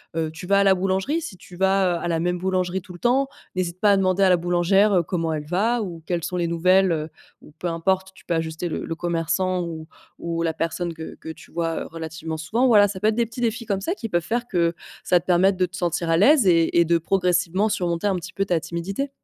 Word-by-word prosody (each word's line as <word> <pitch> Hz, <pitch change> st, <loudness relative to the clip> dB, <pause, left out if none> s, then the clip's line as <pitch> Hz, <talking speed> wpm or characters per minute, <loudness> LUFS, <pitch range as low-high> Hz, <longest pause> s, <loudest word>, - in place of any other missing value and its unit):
heu, 160 Hz, -1 st, -1 dB
tu 165 Hz, +3 st, -9 dB
vas 200 Hz, 0 st, +4 dB
à -, -, +4 dB
la 195 Hz, -1 st, +5 dB
boulangerie, 190 Hz, -, 0 dB
si 195 Hz, -, -7 dB
tu 180 Hz, 0 st, -14 dB
vas, 190 Hz, -1 st, +2 dB
heu, -, -, -5 dB
à -, -, -1 dB
la 165 Hz, -1 st, 0 dB
même 180 Hz, +1 st, 0 dB
boulangerie 185 Hz, 0 st, -1 dB
tout 180 Hz, -, -12 dB
le 175 Hz, -, -12 dB
temps, 260 Hz, +3 st, +2 dB, 0.3 s
n'hésite 180 Hz, -1 st, -3 dB
pas 205 Hz, -1 st, +5 dB
à -, -, +3 dB
demander 185 Hz, 0 st, +1 dB
à 190 Hz, -, +5 dB
la 180 Hz, -, +5 dB
boulangère, 175 Hz, +4 st, +2 dB
heu, 180 Hz, -, +4 dB
comment 165 Hz, -1 st, -2 dB
elle 150 Hz, -1 st, -4 dB
va 220 Hz, +7 st, +1 dB
ou 170 Hz, -5 st, -6 dB
quelles 175 Hz, -2 st, -2 dB
sont 180 Hz, -, -3 dB
les 175 Hz, -, 0 dB
nouvelles, 185 Hz, +2 st, +3 dB
heu, 155 Hz, -1 st, -2 dB, 0.3 s
ou -, -, -16 dB
peu 180 Hz, -, -8 dB
importe, 190 Hz, +3 st, -1 dB
tu -, -, -19 dB
peux 170 Hz, -, -1 dB
ajuster 160 Hz, +2 st, -3 dB
le -, -, -4 dB
le 165 Hz, -, -4 dB
commerçant 175 Hz, +2 st, -1 dB
ou 160 Hz, -2 st, -7 dB, 0.3 s
ou 170 Hz, 0 st, -3 dB
la 165 Hz, -1 st, 0 dB
personne 170 Hz, +1 st, -3 dB
que 160 Hz, 0 st, -8 dB
que 160 Hz, -, -10 dB
tu 160 Hz, -, -11 dB
vois, 165 Hz, -1 st, -2 dB
heu, -, -, -8 dB
relativement 160 Hz, -1 st, -6 dB
souvent. 225 Hz, +12 st, +1 dB
Voilà, 205 Hz, -3 st, +6 dB
ça 190 Hz, -1 st, -6 dB
peut 210 Hz, -, +1 dB
être 215 Hz, -, +2 dB
des 235 Hz, 0 st, +2 dB
petits 230 Hz, +2 st, -8 dB
défis 230 Hz, 0 st, -1 dB
comme 195 Hz, -2 st, -1 dB
ça, 345 Hz, -, -2 dB
qui 230 Hz, -, -5 dB
peuvent 175 Hz, -3 st, +1 dB
faire 240 Hz, +6 st, -2 dB
que 170 Hz, -3 st, +1 dB, 0.3 s
ça 180 Hz, -, +3 dB
te 170 Hz, -, -17 dB
permette 185 Hz, +2 st, +3 dB
de 185 Hz, -, +2 dB
te 180 Hz, +1 st, -10 dB
sentir 170 Hz, -1 st, -1 dB
à 165 Hz, -, +4 dB
l'aise 270 Hz, -, +5 dB
et 165 Hz, 0 st, +4 dB
et 170 Hz, -, +5 dB
de 170 Hz, 0 st, +2 dB
progressivement 185 Hz, +3 st, +1 dB
surmonter 175 Hz, -2 st, -1 dB
un 195 Hz, -2 st, +1 dB
petit 185 Hz, +1 st, -8 dB
peu 195 Hz, -, -1 dB
ta 175 Hz, -4 st, +1 dB
timidité. 190 Hz, -, -4 dB
180 Hz, 265 wpm, -23 LUFS, 170-195 Hz, 0.3 s, Voilà